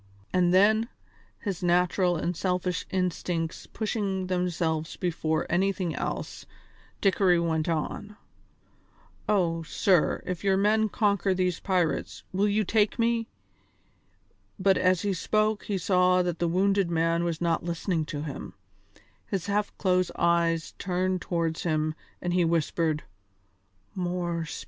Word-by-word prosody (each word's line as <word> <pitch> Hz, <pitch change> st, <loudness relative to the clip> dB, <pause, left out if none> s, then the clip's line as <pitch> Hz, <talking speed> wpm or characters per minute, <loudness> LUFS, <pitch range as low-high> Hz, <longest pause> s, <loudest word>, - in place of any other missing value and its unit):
And 180 Hz, -1 st, +3 dB
then, 215 Hz, +5 st, +4 dB, 0.5 s
his 195 Hz, -5 st, -3 dB
natural 180 Hz, +1 st, +2 dB
and 175 Hz, +2 st, -2 dB
selfish 180 Hz, 0 st, -1 dB
instincts 175 Hz, -2 st, -2 dB
pushing 200 Hz, -4 st, -2 dB
themselves 170 Hz, -3 st, -1 dB
before 160 Hz, -3 st, -1 dB
anything 185 Hz, -1 st, 0 dB
else, -, -, -4 dB, 0.5 s
Dickory 190 Hz, -3 st, +3 dB
went 160 Hz, -1 st, 0 dB
on: 205 Hz, +6 st, -3 dB, 1.1 s
"Oh, 170 Hz, -5 st, +2 dB
sir, 175 Hz, +2 st, +1 dB
if 180 Hz, 0 st, -4 dB
your 195 Hz, -1 st, +3 dB
men 215 Hz, +2 st, +3 dB
conquer 200 Hz, -3 st, +1 dB
these 180 Hz, -1 st, 0 dB
pirates 180 Hz, -4 st, -1 dB
will 195 Hz, +2 st, +2 dB
you 210 Hz, +1 st, +2 dB
take 210 Hz, +1 st, +1 dB
me 230 Hz, -1 st, +1 dB, 0.6 s
" -, -, -40 dB
but 190 Hz, 0 st, +4 dB
as 185 Hz, -2 st, +2 dB
he 200 Hz, -1 st, +1 dB
spoke 215 Hz, +4 st, 0 dB
he 200 Hz, -, -1 dB
saw 180 Hz, 0 st, +3 dB
that 175 Hz, -2 st, -2 dB
the 170 Hz, -, +1 dB
wounded 195 Hz, +1 st, +2 dB
man 165 Hz, 0 st, +1 dB
was 170 Hz, -2 st, -2 dB
not 170 Hz, -2 st, 0 dB
listening 170 Hz, 0 st, -1 dB
to 145 Hz, -1 st, -5 dB
him; 150 Hz, -3 st, -6 dB, 0.7 s
his 190 Hz, -4 st, -2 dB
half 205 Hz, +1 st, 0 dB
closed 185 Hz, -2 st, +2 dB
eyes 170 Hz, -1 st, +1 dB
turned 185 Hz, 0 st, -1 dB
towards 165 Hz, -2 st, -1 dB
him 155 Hz, -2 st, 0 dB, 0.3 s
and 175 Hz, -1 st, -1 dB
he 180 Hz, -1 st, +3 dB
whispered: 165 Hz, -1 st, 0 dB, 0.9 s
"More 175 Hz, -2 st, -2 dB
spirits!" -, -, -6 dB
180 Hz, 135 wpm, -27 LUFS, 170-195 Hz, 1.1 s, then